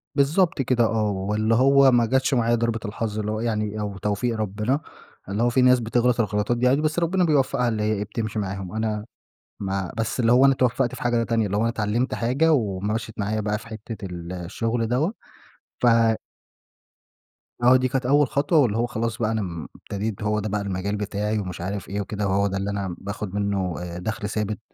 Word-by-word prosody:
بالضبط 155 Hz, +2 st, +2 dB
كده 125 Hz, -1 st, +2 dB
آه، 110 Hz, -2 st, +1 dB
واللي 105 Hz, +4 st, 0 dB
هو 135 Hz, +1 st, +6 dB
ما 120 Hz, -1 st, +4 dB
جتش 130 Hz, +3 st, +1 dB
معايا 120 Hz, -1 st, +3 dB
ضربة 115 Hz, -1 st, 0 dB
الحظ 110 Hz, 0 st, -3 dB
اللي 105 Hz, 0 st, -2 dB
هو 110 Hz, -, -2 dB
يعني، 110 Hz, -2 st, -2 dB
أو 100 Hz, -2 st, -4 dB
توفيق 105 Hz, +4 st, -1 dB
ربنا، 110 Hz, +6 st, -1 dB, 0.5 s
اللي 105 Hz, +4 st, 0 dB
هو 120 Hz, -, +4 dB
في 130 Hz, +2 st, +2 dB
ناس 125 Hz, 0 st, +6 dB
بتغلط 120 Hz, +1 st, +1 dB
الغلطات 105 Hz, +2 st, 0 dB
دي 125 Hz, +1 st, +2 dB
عادي، 140 Hz, +4 st, +3 dB
بس 155 Hz, +2 st, 0 dB
ربنا 180 Hz, +2 st, +1 dB
بيوفقها 140 Hz, -5 st, +2 dB
اللي 110 Hz, -2 st, -1 dB
هي 110 Hz, 0 st, +1 dB
إيه 105 Hz, 0 st, -1 dB
بتمشي 110 Hz, 0 st, -3 dB
معاهم، 95 Hz, -2 st, -4 dB
أنا 110 Hz, -1 st, -2 dB, 0.5 s
ما 95 Hz, -2 st, -2 dB
بس 115 Hz, +3 st, -2 dB
اللي 115 Hz, -1 st, +3 dB
هو 130 Hz, +2 st, +6 dB
أنا 135 Hz, -, +6 dB
اتوفقت 125 Hz, 0 st, +1 dB
في -, -, -10 dB
حاجة 120 Hz, -1 st, +1 dB
تانية، 115 Hz, -2 st, +1 dB
اللي 100 Hz, +1 st, -1 dB
هو -, -, +1 dB
أنا 115 Hz, -, +2 dB
اتعلمت 115 Hz, +3 st, -1 dB
حاجة، 140 Hz, +8 st, +2 dB
ومشِّت 110 Hz, -1 st, -1 dB
معايا 105 Hz, +1 st, -1 dB
بقى 105 Hz, 0 st, -1 dB
في 115 Hz, +2 st, -12 dB
حتّة 110 Hz, -1 st, -7 dB
ال 85 Hz, -1 st, -7 dB
الشغل 115 Hz, +6 st, -2 dB
دوّة، 145 Hz, -, +1 dB, 0.7 s
ف 125 Hz, -, +4 dB, 1.8 s
آه 125 Hz, +1 st, +7 dB
دي 130 Hz, 0 st, +1 dB
كانت 130 Hz, -1 st, -2 dB
أول 145 Hz, +1 st, +4 dB
خطوة، 145 Hz, +4 st, +2 dB
واللي 115 Hz, -5 st, +2 dB
هو 120 Hz, -, +2 dB
خلاص 115 Hz, -1 st, -3 dB
بقى 110 Hz, -1 st, 0 dB
أنا 110 Hz, -1 st, 0 dB
م 85 Hz, -4 st, -5 dB
ابتديت 105 Hz, +1 st, -5 dB
هو 105 Hz, 0 st, +1 dB
ده 105 Hz, 0 st, -3 dB
بقى 105 Hz, 0 st, -1 dB
المجال 100 Hz, +1 st, -2 dB
بتاعي 105 Hz, +1 st, -2 dB
ومش 90 Hz, -3 st, -5 dB
عارف 100 Hz, +2 st, -4 dB
إيه 100 Hz, +1 st, -2 dB
وكده، 105 Hz, 0 st, -3 dB
وهو 100 Hz, +1 st, +2 dB
ده 95 Hz, -1 st, -2 dB
اللي 100 Hz, +1 st, -2 dB
أنا 100 Hz, -3 st, -3 dB
باخد 100 Hz, -1 st, -6 dB
منه 100 Hz, -4 st, -1 dB
آآ، 85 Hz, -1 st, -6 dB
دخل 105 Hz, +1 st, -3 dB
ثابت 105 Hz, 0 st, -2 dB
110 Hz, 210 wpm, -24 LUFS, 100-125 Hz, 1.8 s, آه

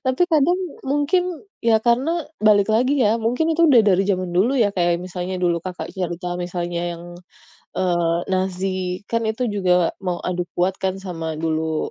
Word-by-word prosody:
Tapi 260 Hz, +6 st, +2 dB
kadang 320 Hz, +4 st, +3 dB, 0.3 s
mungkin, 290 Hz, +6 st, +2 dB, 0.4 s
ya 230 Hz, -1 st, +4 dB
karena 245 Hz, +6 st, +3 dB, 0.4 s
balik 205 Hz, -2 st, +5 dB
lagi 250 Hz, +5 st, +2 dB
ya, 210 Hz, -, +4 dB
mungkin 250 Hz, +8 st, +1 dB
itu 335 Hz, -, +2 dB
udah 255 Hz, -, +7 dB
dari 190 Hz, 0 st, +4 dB
zaman 185 Hz, -2 st, -1 dB
dulu, 215 Hz, +8 st, +3 dB
ya 220 Hz, -4 st, +4 dB
kayak 175 Hz, -1 st, +2 dB
misalnya 180 Hz, 0 st, -4 dB
dulu, 175 Hz, -1 st, +1 dB
Kakak 180 Hz, -1 st, -6 dB
cerita, 180 Hz, -1 st, -3 dB
misalnya 175 Hz, -1 st, -3 dB
yang, 170 Hz, 0 st, -9 dB, 0.7 s
eee, 175 Hz, -2 st, +1 dB
Nazi 185 Hz, 0 st, -2 dB
kan 230 Hz, 0 st, 0 dB
itu 220 Hz, +3 st, -4 dB
juga 185 Hz, -3 st, +1 dB, 0.3 s
mau 175 Hz, -1 st, -1 dB
adu 180 Hz, 0 st, -2 dB
kuat 180 Hz, +2 st, +1 dB
kan 190 Hz, -1 st, 0 dB
sama 165 Hz, -3 st, -4 dB
dulu 160 Hz, -1 st, -1 dB
185 Hz, 165 wpm, -21 LUFS, 175-230 Hz, 0.7 s, udah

